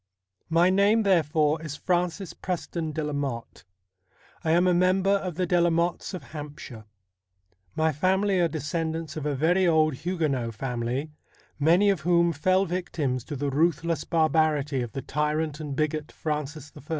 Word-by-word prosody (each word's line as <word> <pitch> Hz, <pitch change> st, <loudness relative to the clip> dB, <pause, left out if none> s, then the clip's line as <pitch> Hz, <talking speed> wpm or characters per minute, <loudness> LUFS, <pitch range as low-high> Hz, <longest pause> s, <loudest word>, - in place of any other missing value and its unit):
My 170 Hz, +3 st, +4 dB
name, 205 Hz, +4 st, +4 dB
therefore, 160 Hz, -4 st, +2 dB
is 155 Hz, -3 st, -6 dB
Francis 180 Hz, +1 st, -1 dB
Preston 170 Hz, -3 st, -4 dB
de 155 Hz, +1 st, -3 dB
la 150 Hz, 0 st, -3 dB
Motte. 135 Hz, -9 st, -4 dB, 0.8 s
I 160 Hz, -, -1 dB
am 175 Hz, +3 st, +4 dB
a 180 Hz, -, +4 dB
member 185 Hz, +2 st, +3 dB
of 190 Hz, -4 st, 0 dB
the 180 Hz, +2 st, 0 dB
De 175 Hz, 0 st, +2 dB
la 175 Hz, -, +4 dB
Mottes 170 Hz, +3 st, -1 dB
of 180 Hz, -, -7 dB
Hampshire. 145 Hz, -7 st, -8 dB, 0.9 s
My 160 Hz, 0 st, +2 dB
family 190 Hz, +5 st, +1 dB
are 170 Hz, -, +3 dB
descendants 160 Hz, +1 st, -3 dB
of 150 Hz, -2 st, -3 dB
a 145 Hz, -, -1 dB
very 175 Hz, +6 st, +2 dB
old 155 Hz, -2 st, +3 dB
Huguenot 145 Hz, -9 st, -2 dB
family, 125 Hz, +5 st, -3 dB, 0.5 s
many 175 Hz, +7 st, +4 dB
of 185 Hz, -6 st, -2 dB
whom 170 Hz, +1 st, +3 dB
fell 185 Hz, +6 st, +2 dB
victims 160 Hz, -, -2 dB
to 150 Hz, -, -5 dB
the 140 Hz, +1 st, -2 dB
ruthless 165 Hz, +1 st, +1 dB
barbarity 155 Hz, -4 st, +1 dB
of 120 Hz, -3 st, -5 dB
the 135 Hz, -, -5 dB
tyrant 150 Hz, +1 st, -1 dB
and 150 Hz, -3 st, -5 dB
bigot 155 Hz, +1 st, -2 dB
Francis 150 Hz, -1 st, -4 dB
I. -, -, -11 dB
160 Hz, 160 wpm, -26 LUFS, 145-175 Hz, 0.9 s, My